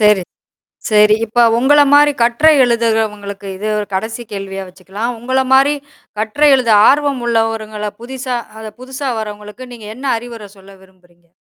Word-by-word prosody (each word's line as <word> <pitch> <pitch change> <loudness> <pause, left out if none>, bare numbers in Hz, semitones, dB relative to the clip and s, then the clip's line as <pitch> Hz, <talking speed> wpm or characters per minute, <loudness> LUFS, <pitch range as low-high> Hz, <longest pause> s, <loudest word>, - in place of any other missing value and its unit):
சரி. 210 -3 +4 0.7
சரி. 210 0 +5
இப்ப 230 +2 -2 0.2
உங்கள 290 +3 +4
மாரி 290 0 +6
கட்டுரை 245 +7 +4
எழுதுறவங்களுக்கு 215 -4 -2
இது 210 +2 -5
ஒரு 205 - -5
கடைசி 225 +4 -4
கேள்வியா 195 -1 -6
வச்சுக்கலாம். 195 +6 -6
உங்களமாரி 265 +3 +2 0.4
கட்டுரை 255 +8 +2
எழுத 245 -4 0 0.2
ஆர்வம் 285 -3 +1
உள்ளவங்கள 220 -2 -2
புதுசா 255 0 -5 0.4
புதுசா 265 +1 -5
வர்றவங்களுக்கு 210 +3 -8
நீங்க 220 -3 -11
என்ன 265 - -10
அறிவுரை 230 -3 -10
சொல்ல 195 +1 -16
விரும்புறீங்க? 175 -2 -26
225 Hz, 130 wpm, -15 LUFS, 210-255 Hz, 0.7 s, மாரி